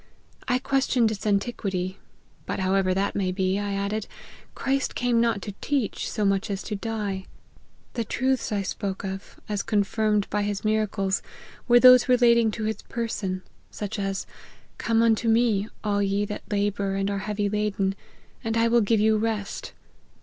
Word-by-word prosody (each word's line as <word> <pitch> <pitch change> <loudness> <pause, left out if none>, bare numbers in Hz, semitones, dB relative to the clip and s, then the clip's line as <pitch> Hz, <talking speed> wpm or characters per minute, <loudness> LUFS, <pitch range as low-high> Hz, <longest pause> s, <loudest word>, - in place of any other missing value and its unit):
I 250 - +3
questioned 255 -3 +2
its 215 0 -4
antiquity; 195 -3 -1 0.2
< - - -34
but - - -2
however 190 0 +2
that 195 +2 0
may 190 -2 0
be,' 190 +1 0
I 205 -1 -2
added, 200 +2 -2 0.3
' - - -23
Christ 270 0 -1
came 240 -2 +2
not 230 -4 +1
to 205 - -4
teach, 275 -8 -1
so 210 -3 -1
much 195 0 +1
as 195 0 -3
to 210 - -4
die; 205 -3 -3 0.7
the 235 - -1
truths 260 +3 0
I 200 -2 0
spoke 195 0 -4
of, 195 0 -6
as 205 -1 -1
con 210 -2 +2
firmed 210 0 +1
by 210 - +1
his 205 0 -2
miracles, 210 -3 +1 0.5
were 240 -1 +7
those 255 0 +8
relating 235 -2 +5
to 215 +1 -4
his 220 0 -2
person, 205 -5 -3 0.3
such 210 0 -5
as, 195 -1 -2 0.3
* - - -30
Come 230 0 +2
unto 230 0 +3
me, 225 -3 +3 0.2
all 205 -1 +1
ye 200 +1 +1
that 210 - -5
labour 200 -1 0
and 195 +1 0
are 200 - -1
heavy 205 +1 -1
laden, 200 -2 0 0.5
and 225 0 -1
I 230 0 +3
will 235 0 +4
give 220 +1 +2
you 215 +1 +4
rest.' 215 -2 -3
210 Hz, 180 wpm, -25 LUFS, 195-230 Hz, 0.7 s, those